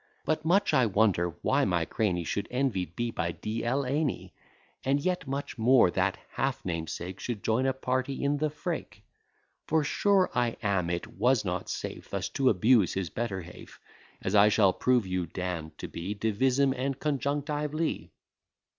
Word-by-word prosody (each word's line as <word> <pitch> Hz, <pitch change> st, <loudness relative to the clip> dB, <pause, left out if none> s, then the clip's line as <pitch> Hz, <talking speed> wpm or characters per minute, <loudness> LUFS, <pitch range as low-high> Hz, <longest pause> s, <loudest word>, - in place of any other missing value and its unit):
But 155 Hz, 0 st, 0 dB
much 185 Hz, +6 st, +3 dB
I 125 Hz, -3 st, +4 dB
wonder, 95 Hz, -5 st, +2 dB
why -, -, +3 dB
my 85 Hz, -2 st, +1 dB
crany 90 Hz, -3 st, 0 dB
Should 100 Hz, -, -2 dB
envied 110 Hz, -, -1 dB
be 120 Hz, +3 st, -1 dB
by 85 Hz, -4 st, -2 dB
De 110 Hz, +6 st, -4 dB
el 130 Hz, +4 st, 0 dB
any: 140 Hz, +1 st, -1 dB, 0.5 s
And 135 Hz, +2 st, +2 dB
yet 180 Hz, +2 st, -1 dB
much 135 Hz, -2 st, -4 dB
more, 115 Hz, -5 st, +5 dB
that 95 Hz, +2 st, 0 dB
half 135 Hz, 0 st, -2 dB
namesake 85 Hz, +2 st, -4 dB
Should 115 Hz, -5 st, -4 dB
join 120 Hz, +4 st, +2 dB
a 135 Hz, -, +2 dB
party 130 Hz, +1 st, -2 dB
in 145 Hz, +1 st, +2 dB
the 155 Hz, +1 st, +1 dB
freak. 150 Hz, -, -5 dB, 0.6 s
For 160 Hz, -1 st, +2 dB
sure 190 Hz, +6 st, +2 dB
I 120 Hz, -2 st, 0 dB
am 95 Hz, -4 st, +1 dB
it 85 Hz, 0 st, -2 dB
was 120 Hz, +1 st, +1 dB
not 90 Hz, -1 st, -3 dB
safe -, -, -5 dB
Thus -, -, -2 dB
to 135 Hz, -2 st, +2 dB
abuse 110 Hz, 0 st, +4 dB
his 95 Hz, -4 st, -2 dB
better 100 Hz, -6 st, -3 dB
half, 90 Hz, -, -13 dB, 0.4 s
As 95 Hz, -, -1 dB
I 105 Hz, 0 st, +7 dB
shall 100 Hz, -3 st, +4 dB
prove 125 Hz, -4 st, +2 dB
you, 90 Hz, -2 st, -2 dB
Dan, 85 Hz, -2 st, -4 dB
to -, -, -6 dB
be, 90 Hz, +5 st, -5 dB
Divisim 130 Hz, +6 st, +2 dB
and 135 Hz, +1 st, -2 dB
conjunctively. 150 Hz, +2 st, -1 dB
120 Hz, 170 wpm, -29 LUFS, 95-140 Hz, 0.6 s, I